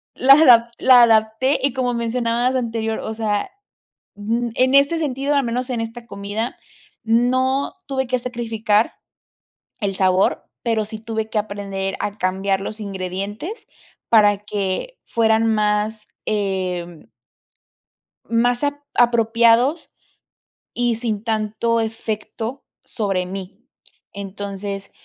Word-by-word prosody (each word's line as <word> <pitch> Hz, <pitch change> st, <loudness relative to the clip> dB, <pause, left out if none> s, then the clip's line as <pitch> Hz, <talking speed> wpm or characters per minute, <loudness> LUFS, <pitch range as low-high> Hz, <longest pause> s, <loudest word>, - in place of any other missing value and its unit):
la 270 Hz, +2 st, +7 dB
adap 245 Hz, -6 st, +7 dB
la 255 Hz, -2 st, +7 dB
adapté 225 Hz, +4 st, +3 dB
y 275 Hz, -2 st, +1 dB
como 250 Hz, -1 st, 0 dB
mencionabas 235 Hz, +1 st, 0 dB
anterior, 225 Hz, -3 st, -2 dB
o 220 Hz, -, -4 dB
sea, 215 Hz, -, -1 dB, 0.7 s
ujú. 230 Hz, +4 st, -1 dB
En 260 Hz, +1 st, +3 dB
este 280 Hz, +4 st, +4 dB
sentido, 285 Hz, -2 st, -1 dB
al 280 Hz, -, +3 dB
menos 245 Hz, +2 st, -2 dB
en 245 Hz, -2 st, -2 dB
esta 230 Hz, +1 st, -7 dB
comida, 205 Hz, +3 st, -4 dB, 0.5 s
no 255 Hz, +5 st, +1 dB
tuve 265 Hz, -1 st, -2 dB
que 255 Hz, -, +1 dB
sacrificar 225 Hz, -3 st, 0 dB, 0.9 s
el 200 Hz, -3 st, -2 dB
sabor, 185 Hz, 0 st, +2 dB, 0.2 s
pero 225 Hz, -3 st, 0 dB
sí 215 Hz, +1 st, -7 dB
tuve 220 Hz, 0 st, -4 dB
que 220 Hz, -, -1 dB
aprender 200 Hz, -2 st, -3 dB
a 205 Hz, 0 st, -3 dB
cambiar 190 Hz, +1 st, 0 dB
los 215 Hz, +3 st, -6 dB
ingredientes 200 Hz, -, -4 dB, 0.6 s
para 205 Hz, -3 st, +5 dB
que 205 Hz, -, -3 dB
fueran 225 Hz, -1 st, +2 dB
más, 210 Hz, 0 st, 0 dB, 0.2 s
eh 185 Hz, -5 st, -2 dB, 1.2 s
más 245 Hz, +3 st, +2 dB
a 290 Hz, 0 st, -2 dB
apropiados 235 Hz, +5 st, +3 dB, 0.8 s
y 240 Hz, -1 st, +1 dB
sin 220 Hz, -3 st, -3 dB
tanto 225 Hz, +1 st, 0 dB
efecto 225 Hz, +3 st, -4 dB, 0.2 s
sobre 195 Hz, -5 st, -2 dB
mí. 190 Hz, +1 st, -7 dB, 0.5 s
Entonces, 200 Hz, 0 st, -6 dB
225 Hz, 115 wpm, -21 LUFS, 205-245 Hz, 1.2 s, la